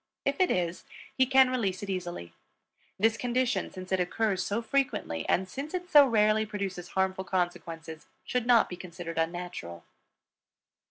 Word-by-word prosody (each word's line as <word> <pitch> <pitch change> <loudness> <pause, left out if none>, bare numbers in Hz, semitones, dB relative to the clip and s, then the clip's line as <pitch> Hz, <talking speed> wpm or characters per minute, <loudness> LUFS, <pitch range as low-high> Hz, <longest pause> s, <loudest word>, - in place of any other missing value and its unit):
If 280 0 0
it 370 - +4
is, 175 -1 -1 0.3
he 260 -1 +3
can 265 -1 +5
release 200 -7 -1
it 200 - -6
easily. 175 - -5 0.6
This 225 +3 +2
condition, 250 +2 0
since 185 -1 -9
it 190 - +2
occurs 190 +1 0
so 205 +3 -1
frequently 230 - -1
and 190 +1 +2
since 285 - -5
it 360 0 -5
so 290 -2 +8
rarely 215 -2 +3
produces 195 -4 -4
harmful 190 0 +1
consequences, 170 -3 -3 0.2
should 250 -1 -1
not 240 -2 +6
be 180 - -7
considered 170 -2 -6
unnatural. 165 - -4
190 Hz, 155 wpm, -29 LUFS, 175-245 Hz, 0.6 s, so